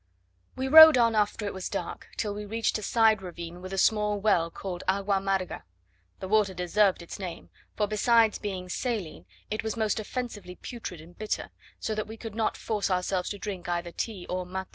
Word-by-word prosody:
We 260 +1 -2
rode 315 0 +10
on 230 -2 +4
after 210 0 0
it 200 - -3
was 190 -1 -5
dark, - - -5
till 210 -2 -1
we 210 +1 -5
reached 225 +2 -1
a - - -7
side 220 -1 +3
ravine 175 -1 -8
with 185 +1 -8
a 195 - -3
small 210 +1 +2
well, 195 -5 +2
called 180 +1 -6
"Agua 195 +1 +2
amarga." 195 -1 -1 0.6
The 190 - -5
water 205 -2 +2
deserved 180 +1 +2
its 170 - -9
name, 180 -3 -7 0.2
for 210 - +1
besides 225 +1 +3
being 190 -3 -4
saline 180 - -3 0.2
it 215 - -1
was 220 +1 -3
most 220 -1 0
offensively 215 -5 -5
putrid 205 -9 -7
and 170 +2 -15
bitter; 215 0 -3 0.3
so 220 - -2
that 215 -1 -3
we 220 +1 -8
could 225 -2 -7
not 220 0 -1
force 210 -3 -1
ourselves 180 0 0
to 205 - -4
drink 190 -4 -6
either 175 0 -2
tea 200 -1 -4
or 185 0 -2
mate. 190 +1 -5
205 Hz, 200 wpm, -28 LUFS, 180-220 Hz, 0.6 s, rode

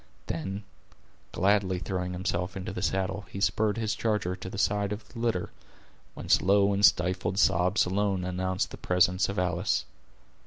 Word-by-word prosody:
Then, 95 +5 -4 0.7
gladly 95 0 +2
throwing 90 0 -3
himself 90 0 -2
into 95 +2 -5
the - - -4
saddle, 95 +1 -1
he 100 - -6
spurred 105 +2 +1
his 110 -2 -1
charger 105 -5 -1
to 95 - -8
the 100 - -7
side 100 +1 +1
of 105 +1 -6
the 120 - -10
litter, 115 -6 -1 0.6
whence - - +2
low 100 +1 +4
and 100 +1 -1
stifled 90 0 +3
sobs 90 +1 +3
alone 95 0 0
announced 90 +1 -2
the - - -8
presence 90 +1 +2
of 100 - -4
Alice. 90 +1 0
95 Hz, 160 wpm, -28 LUFS, 90-100 Hz, 0.7 s, low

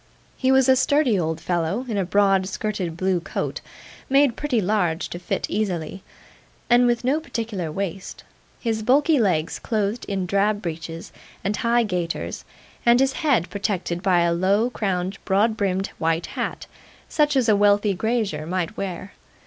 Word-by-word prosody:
He 260 0 +1
was 265 -1 +4
a 260 - +6
sturdy 270 -5 +2
old 160 -1 -2
fellow 175 +7 -1
in 225 - -3
a 200 - +1
broad 195 0 +2
skirted 190 -4 -3
blue 185 0 +1
coat, 170 - -4 0.5
made 275 -2 +4
pretty 290 -6 0
large, 180 -5 0
to 175 - -6
fit 175 - -2
easily, 190 -4 -2 0.7
and 245 +1 +6
with 240 0 +1
no 270 +5 +2
particular 220 - -4
waist; 195 +1 -5 0.4
his 225 -2 -1
bulky 285 +6 +3
legs 170 -8 0
clothed 215 +1 -2
in 195 -2 -2
drab 200 +3 +1
breeches 165 -2 -6 0.3
and 200 +2 0
high 235 +1 +2
gaiters, 180 -5 -3 0.4
and 240 +1 +5
his 270 0 +2
head 275 - +1
protected 185 -3 -2
by 180 -3 +3
a 170 0 +2
low 200 +7 +2
crowned 190 -3 -2
broad 210 +3 +2
brimmed 195 -3 -1
white 165 +1 0
hat, - - -4 0.4
such 295 -1 +1
as 255 -3 +2
a 215 - +5
wealthy 205 0 +3
grazier 200 -7 -1
might 185 +3 -2
wear. 190 0 -5
200 Hz, 160 wpm, -23 LUFS, 180-235 Hz, 0.7 s, a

